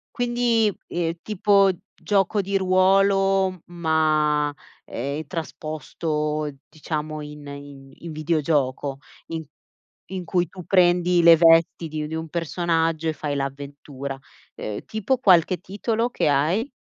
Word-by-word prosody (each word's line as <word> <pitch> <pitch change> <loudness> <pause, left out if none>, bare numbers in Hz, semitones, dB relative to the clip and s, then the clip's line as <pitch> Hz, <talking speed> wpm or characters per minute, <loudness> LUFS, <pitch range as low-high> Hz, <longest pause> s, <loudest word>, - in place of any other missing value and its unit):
Quindi, 240 -3 +2 0.2
ehm, 170 -1 -2
tipo 200 -1 +3 0.2
gioco 200 0 +1
di 195 +1 0
ruolo, 190 0 +3
ma, 155 -3 +1 0.3
ehm, 140 +6 -4
trasposto 155 -1 -3 0.2
diciamo 155 -1 -5
in 150 0 -10
in 140 -1 -10
in 165 -2 -8
videogioco, 145 -3 -1 0.3
in 165 -1 -4 0.7
in 185 -2 -4
cui 175 -3 0
tu 180 -3 -11
prendi 175 -1 +4
le 165 -1 +8
vesti 165 0 +4
di 155 0 -4
di 160 - -6
un 160 0 -4
personaggio 165 -1 -1
e 155 - 0
fai 145 -1 -3
l'avventura, 140 0 -6 0.4
ehm, 105 -1 -5
tipo 220 +4 -1
qualche 185 -6 +4
titolo 225 +4 -2
che 155 - 0
hai? 165 - +1
165 Hz, 120 wpm, -23 LUFS, 150-190 Hz, 0.7 s, le